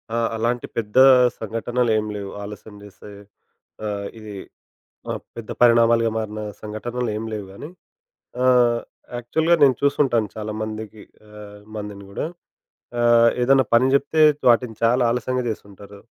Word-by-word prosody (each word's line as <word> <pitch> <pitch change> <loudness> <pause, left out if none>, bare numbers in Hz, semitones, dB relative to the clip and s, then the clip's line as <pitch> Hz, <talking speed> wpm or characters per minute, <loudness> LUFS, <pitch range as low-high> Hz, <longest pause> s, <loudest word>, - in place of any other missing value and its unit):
ఆ! - - 0 0.2
అలాంటి 120 +2 -1
పెద్ద 110 +1 -3 0.4
సంఘటనలేం 115 0 -1
లేవు 100 -1 -6
ఆలస్యం 105 +1 -10
జేసేవి. 105 0 -13 0.6
ఆ! - - -1 0.3
ఇది. 105 -2 -9 0.8
ఆహ్, - - -5
పెద్ద 115 -2 -9
పరిణామాలుగా 115 -1 +4
మారిన 110 -1 -4 0.2
సంఘటనలేం 110 +1 -4
లేవు 105 -2 -5
గానీ. 145 +10 -9 0.8
ఆహ్, 120 -2 +4 0.4
యాక్చువల్‌గా 160 +8 +1
నేను 135 -2 +5
చూసుంటాను 130 -6 +2
చాలామందికి 110 0 -6 0.3
ఆహ్, 105 -1 -12 0.2
మందిని 105 -1 -7
గూడా. 100 - -3 0.8
ఆహ్, 120 0 +5
ఏదన్నా 135 0 +4
పని 125 +3 +5
జెప్తే 145 +3 +1 0.3
వాటిని 120 -1 +2
చాలా 125 +2 +3
ఆలస్యంగా 125 +1 -2
జేస్తుంటారు. 100 -1 -9
115 Hz, 120 wpm, -22 LUFS, 105-120 Hz, 0.8 s, నేను